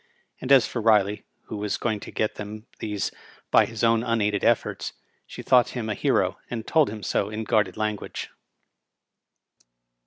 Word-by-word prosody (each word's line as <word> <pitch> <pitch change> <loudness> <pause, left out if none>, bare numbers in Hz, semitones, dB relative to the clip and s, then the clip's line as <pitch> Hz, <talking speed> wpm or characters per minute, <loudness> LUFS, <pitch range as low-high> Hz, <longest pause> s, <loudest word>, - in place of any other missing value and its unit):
And 130 - -4
as 135 -4 +7
for 120 - -4
Riley, 105 -2 +3 0.2
who 110 - -7
was 105 0 -2
going 110 -3 -1
to - - -9
get 110 - -1
them 105 +1 -8
these 105 -2 -2 0.4
by - - +6
his 115 0 -6
own 115 -1 +4
unaided 110 -4 0
efforts, - - +1 0.3
she - - -9
thought 125 -2 +5
him 110 -2 -3
a - - +1
hero, - - +1
and 115 -2 -4
told 155 -3 +3
him 105 -1 -7
so 100 - 0
in 110 +1 -4
guarded 105 -4 +1
lan 105 -1 0
guage. - - -7
110 Hz, 175 wpm, -25 LUFS, 105-115 Hz, 0.4 s, as